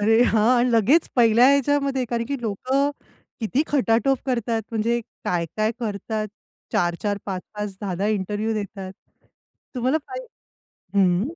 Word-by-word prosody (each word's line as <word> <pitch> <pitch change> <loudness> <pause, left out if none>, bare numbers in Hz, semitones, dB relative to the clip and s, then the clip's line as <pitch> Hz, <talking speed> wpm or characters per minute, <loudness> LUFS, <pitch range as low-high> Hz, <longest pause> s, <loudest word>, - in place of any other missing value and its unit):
अरे 225 +3 +5
हां, 220 -2 +3
आणि 245 +1 +2
लगेच 235 +9 +4
पहिल्या 235 0 +6
ह्याच्यामध्ये! 280 -1 +2
कारण 235 -1 0
की 280 0 -3
लोकं 260 +6 0 0.5
किती 240 +6 +1
खटाटोप 260 -1 +2
करतात. 235 -3 0
म्हणजे 230 +1 0 0.2
काय, 170 -2 0
काय 215 +1 +1
करतात, 215 0 -3 0.4
4-4 175 +4 0
5-5 200 +1 -5
10-10 195 -1 -2
इंटरव्ह्यू 210 +1 -1
देतात. 195 -2 -5 0.8
तुम्हाला 255 +4 +1
पाहि - - -6 0.7
हं. 185 -2 +4
225 Hz, 125 wpm, -23 LUFS, 205-255 Hz, 0.8 s, पहिल्या